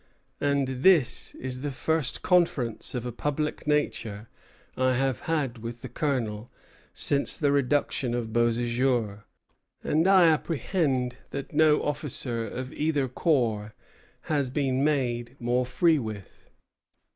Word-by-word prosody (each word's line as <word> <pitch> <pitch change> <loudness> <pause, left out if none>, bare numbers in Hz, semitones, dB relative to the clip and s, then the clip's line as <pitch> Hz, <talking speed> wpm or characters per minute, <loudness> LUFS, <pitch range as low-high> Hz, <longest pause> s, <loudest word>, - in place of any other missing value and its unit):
And 140 -1 +1
this 165 -7 +3
is 130 0 -5
the 145 - -2
first 150 0 -1
conference 160 - +1
of 125 -1 -3
a 125 - -3
public 150 +5 -3
nature 115 -8 -1 0.5
I 130 0 +2
have 130 -2 0
had 140 -7 -1
with 115 +1 -7
the 130 - -6
colonel 120 -5 -2 0.4
since 140 -1 0
the 145 -2 +2
reduction 140 -2 +1
of 120 -2 -3
Beauséjour; 120 -2 0 0.6
and 160 +4 +2
I 190 -2 +7
apprehend 150 -5 0
that 140 +1 -6
no 155 0 +4
officer 130 -5 -2
of 130 +5 -6
either 150 -3 0
corps 115 -7 0 0.5
has 145 -4 -1
been 135 0 0
made 125 -4 0
more 125 +1 0
free 160 +5 +3
with." 110 -5 -8
130 Hz, 125 wpm, -27 LUFS, 120-150 Hz, 0.6 s, I